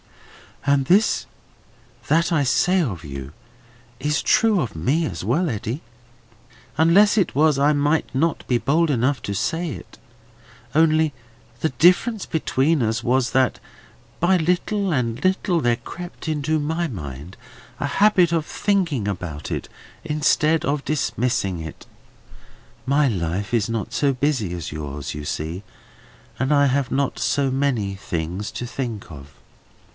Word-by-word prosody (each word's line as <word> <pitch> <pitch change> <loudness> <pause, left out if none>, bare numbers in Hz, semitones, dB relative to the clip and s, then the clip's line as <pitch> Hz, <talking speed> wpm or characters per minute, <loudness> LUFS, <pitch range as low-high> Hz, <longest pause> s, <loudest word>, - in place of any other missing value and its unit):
"All 140 0 +4
this 180 +11 +2 0.8
that 165 +3 +2
I 155 -4 +3
say 180 +8 +3
of 95 - -3
you 70 -1 -7 0.7
is 150 +3 0
true 220 -4 +3
of 115 - -4
me 135 - +1
as 90 - -5
well, 145 - +1
Eddy. 120 +4 -3 1.0
Unless 195 +7 +5
it 190 - 0
was, 150 0 +4
I 145 +2 +4
might 145 +2 +1
not 160 +5 0
be 125 - +2
bold 160 +6 +2
enough 130 +1 +1
to 100 - -3
say 165 - -1
it. 95 - -9 0.8
Only, 155 -1 +3 0.5
the 160 - +2
difference 180 - +3
between 155 -1 +1
us 115 +2 -1
was, 125 0 +1
that 130 -1 +2 0.6
by 185 +2 +4
little 180 +4 0
and 120 -4 -1
little 185 -2 +1
there 120 -2 +2
crept 175 +3 -9
into 155 0 0
my 160 +3 -1
mind 75 - -8 0.4
a - - -1
habit 185 +1 +4
of 165 -2 0
thinking 170 - 0
about 90 -6 -5
it, - - -3 0.4
instead 155 +1 +2
of 140 0 -1
dismissing 120 - -1
it. 80 -1 -8 1.0
My 140 +2 +3
life 95 -1 -2
is 115 -4 +2
not 115 0 -3
so 140 +2 +2
busy 130 - 0
as 85 -2 -5
yours, 75 -2 -5
you 75 0 -6
see, 80 +6 -4 0.8
and 130 +3 0
I 145 -1 +4
have 135 -1 0
not 140 0 0
so 140 -1 +1
many 130 -7 0
things 90 +2 -4
to 120 - -4
think 120 -6 -5
of. 70 -2 -11
140 Hz, 145 wpm, -22 LUFS, 105-160 Hz, 1.0 s, Unless